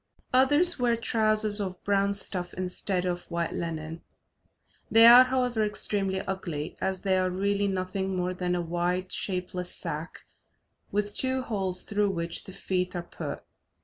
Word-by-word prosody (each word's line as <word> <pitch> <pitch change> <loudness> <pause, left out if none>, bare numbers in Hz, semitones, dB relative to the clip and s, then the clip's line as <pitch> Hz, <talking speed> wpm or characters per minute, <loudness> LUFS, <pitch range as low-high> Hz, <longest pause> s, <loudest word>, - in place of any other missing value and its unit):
Others 290 +6 +5
wear 240 -1 +2
trousers 215 -2 +1
of 185 -2 -5
brown 200 0 +1
stuff 180 -2 -4
instead 185 0 -2
of 175 -1 -3
white 170 -1 -2
linen; 165 -1 -5 0.9
they 225 +1 +7
are, 245 +2 +10
however, 250 -3 0
extremely 200 -2 -1
ugly, 170 -6 -4
as 190 -1 -2
they 190 -2 +1
are 185 0 +1
really 200 +2 0
nothing 190 0 -2
more 180 0 -1
than 180 -1 -1
a 175 - -1
wide 175 +2 -1
shapeless 180 -1 -2
sack - - -5 0.7
with 205 0 -1
two 260 +2 0
holes, 190 -6 -1
through 205 -1 0
which 170 -2 -4
the 190 - -10
feet 180 -1 -2
are 175 - -3
put. - - -7
190 Hz, 150 wpm, -27 LUFS, 180-210 Hz, 0.9 s, are